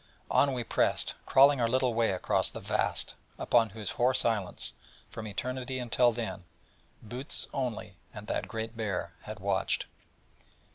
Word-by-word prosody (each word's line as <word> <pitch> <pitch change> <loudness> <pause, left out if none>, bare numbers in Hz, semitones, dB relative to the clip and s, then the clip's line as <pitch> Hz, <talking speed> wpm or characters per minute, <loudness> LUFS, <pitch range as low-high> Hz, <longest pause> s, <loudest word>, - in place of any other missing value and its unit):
On 140 -1 +4
we 125 -2 -2
pressed, - - +1
crawling 140 0 +6
our 115 - +3
little 130 0 +2
way 115 0 +2
across 95 - +1
the - - -7
Vast, - - -1 0.2
upon 115 -2 +3
whose 105 -1 -4
hoar 125 +2 +2
silence, 110 -7 0 0.4
from 110 -1 -6
Eternity 130 +5 -3
until 120 0 +3
then, 115 -4 -4 0.6
Bootes 125 +6 -2
only, 120 -8 -3
and 105 - -9
that - - -2
Great 110 0 -5
Bear, 100 -6 -2
had 110 0 -7
watched. 95 0 0
115 Hz, 145 wpm, -30 LUFS, 105-125 Hz, 0.6 s, crawling